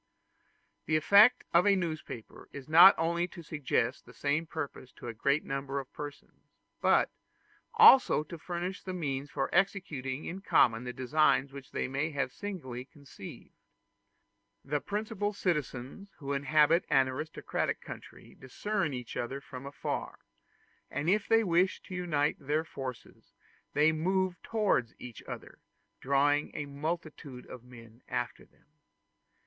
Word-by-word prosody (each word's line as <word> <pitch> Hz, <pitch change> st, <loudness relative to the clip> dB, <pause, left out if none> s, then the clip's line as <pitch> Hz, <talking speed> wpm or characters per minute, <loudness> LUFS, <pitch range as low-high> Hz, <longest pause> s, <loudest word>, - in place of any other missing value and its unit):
The 155 Hz, -, +2 dB
effect 200 Hz, +9 st, +6 dB
of 175 Hz, +4 st, +5 dB
a 200 Hz, -, +6 dB
newspaper 155 Hz, -, -5 dB
is 140 Hz, -2 st, -9 dB
not 170 Hz, +5 st, +9 dB
only 170 Hz, +2 st, 0 dB
to 175 Hz, -1 st, -11 dB
suggest 140 Hz, -5 st, -1 dB
the -, -, -14 dB
same 145 Hz, +3 st, 0 dB
purpose 145 Hz, -5 st, -6 dB
to -, -, -10 dB
a 115 Hz, -, -4 dB
great 140 Hz, +6 st, +1 dB
number 135 Hz, 0 st, -3 dB
of 135 Hz, -, -10 dB
persons, 145 Hz, -1 st, -10 dB, 0.3 s
but -, -, +3 dB, 0.6 s
also 270 Hz, -, +7 dB
to 160 Hz, +2 st, -9 dB
furnish 180 Hz, +4 st, -5 dB
means 145 Hz, -6 st, -3 dB
for 135 Hz, -, -1 dB
executing 155 Hz, -8 st, 0 dB
in 190 Hz, +3 st, -5 dB
common 120 Hz, -9 st, +3 dB
the 125 Hz, -, -3 dB
designs 135 Hz, +1 st, +2 dB
which 140 Hz, -2 st, -10 dB
they -, -, -2 dB
may 140 Hz, +4 st, -1 dB
have 140 Hz, -4 st, -2 dB
singly 150 Hz, -12 st, -6 dB
conceived. 140 Hz, -1 st, -12 dB, 1.1 s
The 145 Hz, +1 st, -1 dB
principal 210 Hz, -, -2 dB
citizens 160 Hz, -, -3 dB
who 140 Hz, -1 st, -4 dB
inhabit 150 Hz, +4 st, +3 dB
an 135 Hz, -1 st, +4 dB
aristocratic 145 Hz, +5 st, -3 dB
country -, -, -11 dB
discern 155 Hz, +3 st, -3 dB
each 125 Hz, -2 st, -7 dB
other 130 Hz, +3 st, -3 dB
from 130 Hz, 0 st, -9 dB
afar; 140 Hz, -, -4 dB, 0.7 s
and 160 Hz, +5 st, 0 dB
if 205 Hz, 0 st, +1 dB
they 225 Hz, 0 st, +4 dB
wish 180 Hz, 0 st, +2 dB
to -, -, -10 dB
unite 155 Hz, -5 st, 0 dB
their 150 Hz, +3 st, 0 dB
forces, 135 Hz, -6 st, -9 dB, 0.4 s
they 150 Hz, +2 st, +4 dB
move 185 Hz, +2 st, 0 dB
towards 210 Hz, -, 0 dB
each 125 Hz, -2 st, -10 dB
other, -, -, -8 dB, 0.4 s
drawing 145 Hz, +2 st, +2 dB
a 150 Hz, -, -3 dB
multitude 145 Hz, -3 st, -5 dB
of 125 Hz, -2 st, -10 dB
men 115 Hz, -1 st, -15 dB
after -, -, -4 dB
them. -, -, -31 dB
150 Hz, 140 wpm, -31 LUFS, 135-175 Hz, 1.1 s, not